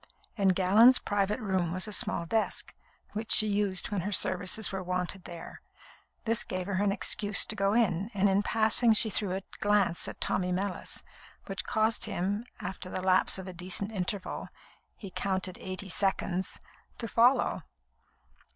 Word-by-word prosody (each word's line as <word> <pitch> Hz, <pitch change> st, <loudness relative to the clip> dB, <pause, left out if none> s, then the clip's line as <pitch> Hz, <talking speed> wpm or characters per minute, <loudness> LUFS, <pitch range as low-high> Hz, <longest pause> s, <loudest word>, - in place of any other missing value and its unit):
In 200 Hz, -4 st, +1 dB
Gallon's 195 Hz, +7 st, +5 dB
private 205 Hz, +2 st, -1 dB
room 190 Hz, -6 st, -1 dB
was 185 Hz, +3 st, -2 dB
a 210 Hz, -, -6 dB
small 170 Hz, -, +2 dB
desk, 220 Hz, +6 st, -2 dB, 0.4 s
which 215 Hz, +1 st, -5 dB
she 215 Hz, -, +10 dB
used 205 Hz, -3 st, 0 dB
when 200 Hz, -3 st, -1 dB
her 205 Hz, +4 st, -4 dB
services 185 Hz, +2 st, +1 dB
were 190 Hz, -1 st, -4 dB
wanted 180 Hz, +1 st, -3 dB
there. 170 Hz, -1 st, -10 dB, 0.6 s
This 230 Hz, 0 st, +1 dB
gave 185 Hz, -1 st, -5 dB
her 195 Hz, 0 st, -1 dB
an 200 Hz, -, +2 dB
excuse 205 Hz, 0 st, +2 dB
to 215 Hz, -, -4 dB
go 195 Hz, 0 st, +1 dB
in, 205 Hz, -4 st, +1 dB
and 200 Hz, +1 st, +3 dB
in 195 Hz, +1 st, +2 dB
passing 220 Hz, +2 st, +3 dB
she 220 Hz, 0 st, +3 dB
threw 195 Hz, -2 st, -1 dB
a 190 Hz, -, -5 dB, 0.2 s
glance 205 Hz, -5 st, +1 dB
at -, -, -8 dB
Tommy 180 Hz, -1 st, -1 dB
Mellis, 185 Hz, +1 st, -3 dB, 0.4 s
which 195 Hz, -1 st, -5 dB
caused 220 Hz, +1 st, 0 dB
him, 205 Hz, +6 st, -3 dB
after 185 Hz, 0 st, -7 dB
the 185 Hz, -, -4 dB
lapse 185 Hz, 0 st, +3 dB
of 190 Hz, 0 st, -8 dB
a 185 Hz, -, -7 dB
decent 185 Hz, +4 st, -3 dB
interval 190 Hz, -1 st, -4 dB, 0.5 s
(he 195 Hz, -3 st, -10 dB
counted 190 Hz, -1 st, -3 dB
eighty 185 Hz, +1 st, -5 dB
seconds), 190 Hz, -1 st, -1 dB, 0.4 s
to 230 Hz, -, -4 dB
follow. 240 Hz, +4 st, +2 dB
195 Hz, 165 wpm, -29 LUFS, 185-210 Hz, 0.6 s, she